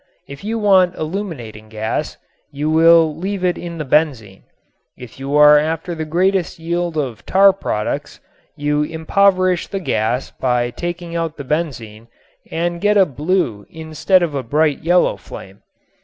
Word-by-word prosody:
If 140 +3 -10
you 225 +2 -2
want 190 -4 +3
illuminating 155 - -6
gas 110 0 -3 0.3
you 150 +2 -2
will 165 -1 +5
leave 190 +3 -4
in 180 -1 +1
it 170 -1 -7
the 155 - -4
benzene. 130 -10 0 0.6
If 125 0 -12
you 135 +2 -3
are 150 0 +7
after 160 +3 -3
the 160 -1 -4
greatest 185 +2 0
yield 170 0 -3
of 125 -7 -3
tar 195 +1 +5
products, 105 - -4 0.4
you 150 0 0
impoverish 185 +3 +1
the 195 - -4
gas 120 - -1
by 125 -1 -1
taking 175 +2 -6
out 165 -1 -3
the 140 - -6
benzene 125 -8 -4 0.4
and 170 +1 -2
get 210 0 +3
a 195 - +6
blue 145 - -2
instead 160 +3 +1
of 165 -4 -2
a 140 - -2
bright 150 +4 0
yellow 175 +2 +2
flame. 95 +1 -12
160 Hz, 155 wpm, -18 LUFS, 135-175 Hz, 0.6 s, are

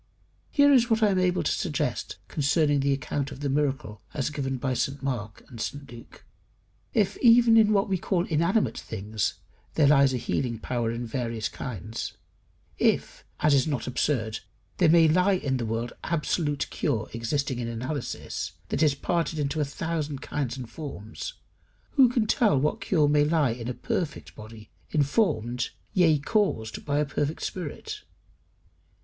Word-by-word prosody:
Here 285 -1 +5
is 245 -2 +4
what 225 -1 +2
I 210 - +5
am 190 - +2
able 180 0 +2
to - - +1
suggest - - -2
concerning 145 0 +2
the 140 +1 +1
account 140 +1 -2
of 140 0 -9
the 145 - -1
miracle 135 -6 -1
as 140 0 -1
given 135 -2 -2
by 130 0 -1
St 140 +2 -2
Mark 115 -6 -4
and 115 -4 -9
St 140 +1 -5
Luke. 120 -1 -13 0.7
If 205 -4 +1
even 235 -1 +6
in 220 -1 +6
what 200 0 +3
we 190 -2 0
call 180 -1 0
inanimate 170 +7 +1
things 105 0 -3 0.4
there 155 - +4
lies 140 -1 +5
a 130 - -1
healing 120 -1 -2
power 120 +1 -2
in 120 +1 -4
various 115 -2 -2
kinds; 110 -2 -6 0.7
if, - - +1 0.2
as 150 - +4
is 140 +2 +3
not 140 -7 -2
absurd, 115 -4 -1 0.4
there 175 -3 +4
may 165 0 +6
lie 180 +5 +4
in 140 -8 0
the 120 -2 -3
world 115 +2 -2
absolute 150 -2 -1
cure 110 -1 -1
existing 125 +3 -1
in 120 - -3
analysis, 125 +4 -4 0.2
that - - -1
is 150 -3 +4
parted 165 +2 -1
into 150 +1 -1
a - - +2
thousand 150 -1 -3
kinds 140 -3 -3
and 125 -3 -6
forms, 125 -9 -7 0.6
who 265 -4 +6
can 235 -2 +1
tell 215 - +3
what 150 +3 0
cure 155 -6 +2
may 145 0 +4
lie 150 -4 +2
in 115 0 -5
a 125 - -3
perfect 160 -4 -3
body, 110 0 -12 0.2
informed, 130 - +1 0.2
yea, 165 -5 +4
caused, 145 - -1
by 145 -1 0
a 150 - +2
perfect 145 +2 -2
spirit? 305 - -5
145 Hz, 165 wpm, -27 LUFS, 120-170 Hz, 0.7 s, even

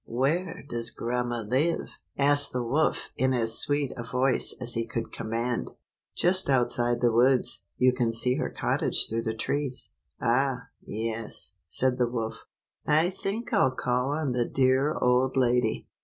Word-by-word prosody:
"Where 155 +9 -1
does 115 -3 -2
grandma 120 0 -2
live?" 135 +10 -1 0.2
asked 145 0 +3
the 125 -1 -1
wolf 145 +7 0
in 130 +1 +2
as 115 -2 +2
sweet 145 -1 0
a - - -5
voice 125 +2 +1
as 120 -2 -2
he 115 -1 -2
could 115 0 -4
command. 115 +2 -3 0.5
"Just 185 -1 +3
outside 120 -2 +2
the 120 -1 +3
woods. 125 +3 +3
You 125 0 +4
can 120 -2 0
see 125 +3 +3
her - - -2
cottage - - +1
through 115 +1 -2
the 110 -1 -3
trees." 140 +2 -2 0.3
"Ah, 125 +1 0
yes;" 110 +1 -4 0.2
said 130 -1 0
the 120 -1 +2
wolf. 115 -2 -4 0.4
"I 155 +4 +3
think 210 +6 -4
I'll 130 - +3
call 125 +1 0
on 145 -2 -1
the 125 -1 0
dear 135 +3 +2
old 125 +2 +2
lady. 125 - +1
125 Hz, 155 wpm, -27 LUFS, 120-140 Hz, 0.5 s, You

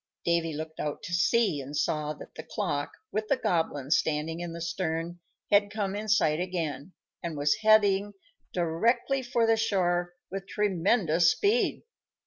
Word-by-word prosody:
Davy 170 -1 +1
looked 160 +1 -6
out 150 -1 -3
to 175 - -6
sea, 195 -3 +2
and 140 +2 -6
saw 150 0 0
that 150 - -12
the - - -7
clock, 145 -2 -3 0.2
with 215 0 -2
the 275 - +2
Goblin 150 - -1
standing 160 +1 +1
in 175 -1 -4
the 170 - -7
stern, 170 0 -3 0.3
had 205 0 +5
come 205 -2 -2
in 215 +1 -4
sight 160 -8 +3
again, 170 -3 -3 0.3
and 170 -4 -4
was 145 0 +2
heading 205 -2 +4 0.4
directly 230 +11 +1
for 240 -2 +1
the 225 0 +3
shore 175 -5 0 0.2
with 195 0 -5
tremendous 180 -4 +2
speed. 430 +4 +1
175 Hz, 155 wpm, -28 LUFS, 160-210 Hz, 0.4 s, had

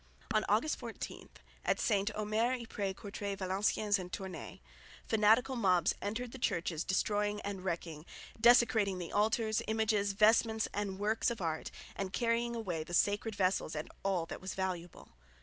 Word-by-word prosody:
On 215 - +3
August 225 +10 +2
14, - - -7 0.3
at - - +1
St 205 -2 +2
Omer, 215 +3 +1
Ypres, 210 -5 -4
Courtray, 200 -1 -4
Valenciennes 200 +2 +1
and 180 -1 -7
Tournay, 190 -5 -6 0.5
fanatical 225 +4 +4
mobs 185 -7 +3
entered 225 +4 -3
the 265 - -9
churches 170 -7 -1
destroying 205 +2 0
and 200 -2 -5
wrecking, 165 -3 -4 0.3
desecrating 230 -4 +5
the 175 -2 -6
altars, 220 +1 +1
images, 215 -2 +1
vestments 220 +2 +4
and 200 -2 -2
works 210 +4 +1
of 235 - -4
art, 160 -3 -2 0.3
and 195 -1 -4
carrying 235 0 +1
away 180 -9 -3
the 175 +2 -4
sacred 205 +4 +1
vessels 185 -4 +1
and 150 - -5
all 190 -4 +1
that - - -7
was 185 - -5
valuable. 180 -2 -4
205 Hz, 150 wpm, -33 LUFS, 185-220 Hz, 0.5 s, desecrating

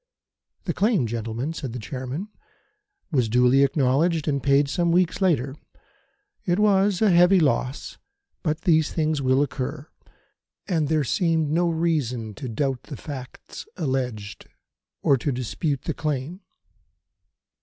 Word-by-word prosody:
"The - - -2
claim, 205 - +2
gentlemen," 115 +6 -3
said 135 -7 -6
the - - -4
Chairman, 130 - -5 0.8
"was 125 -7 +1
duly 125 +3 +4
acknowledged 145 +4 +1
and 140 -2 0
paid 140 +1 +3
some 170 +4 0
weeks 180 +2 +1
later. 140 -8 +1 0.9
It 175 -1 +1
was 205 -1 +3
a 210 - +5
heavy 180 +2 +6
loss; 135 -3 -1 0.4
but 155 -2 -1
these 160 -4 +3
things 155 -2 0
will 130 +1 +3
occur, 135 +2 -5 0.8
and 160 -6 +1
there 155 0 +1
seemed 160 +1 +1
no 170 +2 +2
reason 145 -10 -1
to 130 +3 -7
doubt 130 +2 -1
the 140 -2 -9
facts 130 -2 -9
alleged, 125 - -3 0.6
or 140 - +4
to 140 +3 -2
dispute 130 +3 -2
the - - -2
claim." 150 +5 -3
145 Hz, 135 wpm, -24 LUFS, 130-165 Hz, 0.9 s, heavy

